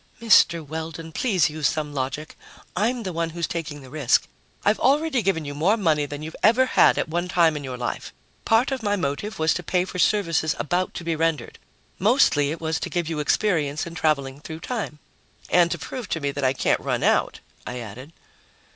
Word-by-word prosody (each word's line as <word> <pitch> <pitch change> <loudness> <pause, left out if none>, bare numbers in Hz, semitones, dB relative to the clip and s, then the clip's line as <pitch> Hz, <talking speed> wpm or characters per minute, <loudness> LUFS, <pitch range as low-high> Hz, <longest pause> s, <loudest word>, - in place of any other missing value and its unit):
"Mr. 170 -7 +4
Weldon, 160 +1 -6
please 185 - +2
use 155 -2 0
some 150 0 -2
logic. 140 +3 -4 0.4
I'm 230 +5 0
the 185 -3 -4
one 165 0 -1
who's 170 +1 -3
taking 150 -3 -5
the 130 - -12
risk. 145 -5 +2 0.4
I've 210 +1 +3
already 280 0 +2
given 190 -6 0
you 145 - -5
more 175 +10 +2
money 155 -7 +1
than 145 +1 -7
you've 160 +1 -7
ever 235 +5 +5
had - - +4
at - - 0
one 175 +3 -2
time 170 -3 +3
in 145 - -5
your 130 -2 -5
life. 120 -1 -4 0.3
Part 225 +5 +3
of 265 -2 -2
my 205 -2 +1
motive 190 +4 -3
was 160 0 +2
to 180 - -3
pay 180 +1 0
for 180 - -6
services 165 -6 +2
about 180 +5 -1
to - - -5
be 165 -1 -1
rendered. 160 -6 -1 0.4
Mostly, 190 - +4
it 160 +2 -4
was 160 0 -1
to - - -4
give 175 -3 -2
you 160 -2 -3
experience 150 -3 +1
in 170 - -8
traveling 140 -5 0
through 160 +1 -8
time." 220 -8 -4 0.5
"And 175 -1 +5
to - - -2
prove 250 -6 -7
to 165 - -1
me 140 -2 -1
that 140 0 -5
I 130 0 +3
can't - - +1
run - - -2
out," - - +2 0.3
I 125 - -4
added. 125 +5 -9
165 Hz, 210 wpm, -24 LUFS, 150-190 Hz, 0.5 s, ever